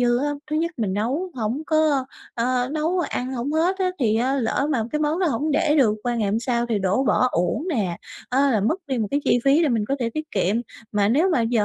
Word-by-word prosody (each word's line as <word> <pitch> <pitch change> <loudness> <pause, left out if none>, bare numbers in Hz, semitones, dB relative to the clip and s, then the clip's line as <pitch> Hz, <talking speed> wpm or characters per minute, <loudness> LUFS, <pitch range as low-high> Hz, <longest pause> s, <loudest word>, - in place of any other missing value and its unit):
dư 240 0 +3
á, 290 +2 0 0.2
thứ 305 - 0
nhất 335 +2 0
mình 210 -5 -1
nấu 275 - -1
hổng 240 +5 -2
có 310 -4 +2 0.3
ơ, 250 +1 0
nấu 320 +4 0
ăn 260 -6 -2
hổng 260 +4 -3
hết 350 +5 +1
á, 370 -1 +1
thì 220 -3 +2
á 255 +4 +1
lỡ 265 +3 0
mà 240 -6 +1
cái 300 - 0
món 305 +3 0
đó 360 - +2
hổng 300 +2 0
để 295 +1 +2
được 225 -7 +4
qua 240 -1 -1
ngày 215 -4 0
hôm 220 - +1
sau, 240 -1 0
thì 225 -3 0
đổ 195 +8 +1
bỏ 255 - +3
uổng 180 - -1
nè 200 - -1 0.3
á, 275 +2 +2
là 220 -5 +2
mất 235 - +1
đi 260 -3 -2
một 215 -2 -1
cái 285 - +1
chi 245 - +3
phí 285 +5 +4
để 305 - +3
mình 225 -4 +1
có 275 - 0
thể 235 -2 -1
tiết 310 +4 -5
kiệm. 195 +2 +1 0.4
Mà 205 -1 +2
nếu 320 +11 +3
mà 255 - +2
giờ 225 -2 +1
255 Hz, 265 wpm, -23 LUFS, 225-300 Hz, 0.4 s, được